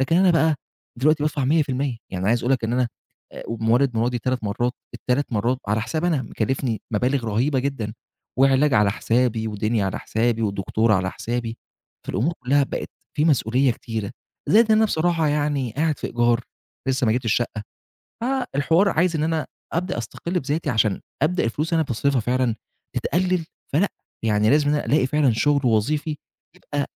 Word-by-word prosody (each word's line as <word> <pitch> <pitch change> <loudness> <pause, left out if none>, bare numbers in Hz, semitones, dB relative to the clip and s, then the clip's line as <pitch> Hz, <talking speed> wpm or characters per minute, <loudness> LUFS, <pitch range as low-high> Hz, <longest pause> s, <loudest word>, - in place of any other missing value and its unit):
لكن 165 +6 +2
أنا 185 -1 +5
بقى 160 -2 +3 0.4
دلوقتي 150 +3 +3
بادفع 150 -2 0
100%. 140 -3 +1 0.2
يعني 95 +2 -1
عايز 120 +1 +3
أقول 125 +3 +1
لك 120 -4 0
إن 115 - -1
أنا 125 -1 +1 0.4
آآ - - -8
مولِّد 115 +2 +1
مراتي 120 +2 +1
3 125 0 -2
مرّات، 120 +4 -1 0.2
ال3 130 +1 -1
مرّات 120 +4 +1
على 110 +1 +1
حسابي 155 +8 -1
أنا 145 -6 +1
مكلِّفني 115 0 -2
مبالغ 125 +4 +1
رهيبة 125 +6 +1
جدًا 125 -6 -3 0.4
وعلاج 135 +1 +4
على 105 -2 +4
حسابي 115 -1 0
ودنيا 105 0 0
على 95 - -3
حسابي 115 0 0
ودكتور 105 +2 +1
على 95 -1 +1
حسابي، 115 -1 -4 0.5
فالأمور 125 - 0
كُلّها 140 +3 +3
بقت - - -5 0.3
في 150 - +2
مسؤولية 130 -3 +3
كتيرة، 115 -3 -5 0.4
زائد 220 +1 +5
أنا 220 +1 +5
بصراحة 165 -4 +1
يعني 145 -5 0
قاعد 155 0 +1
في - - -3
إيجار 120 0 +2 0.5
لسّه 130 -2 +1
ما 110 - +3
جِبتش 120 -3 +1
شقّة، 115 -3 -2 0.6
فالحوار 200 - +1
عايز 165 +1 +2
إن 150 - -1
أنا 160 -1 0 0.3
أبدأ 175 -6 -1
أستَقِل 170 - -3
بذاتي 145 +2 -1
عشان 110 -4 +1 0.2
أبدأ 180 +4 +2
الفلوس 145 +8 -1
اللي 165 - +3
أنا 150 - -5
باصرفها 130 +2 +1
فعلًا 125 0 +1 0.4
تتقلِّل، 180 -1 0 0.3
فلأ، 185 +8 +3 0.4
يعني 105 0 +3
لازم 145 +1 +4
إن 150 - +2
ألاقي 140 -3 +4
فعلًا 140 -2 +2
شُغل 145 +5 +2
وظيفي 145 +8 +1 0.4
يبقى 145 -5 -3
130 Hz, 170 wpm, -23 LUFS, 115-150 Hz, 0.6 s, أنا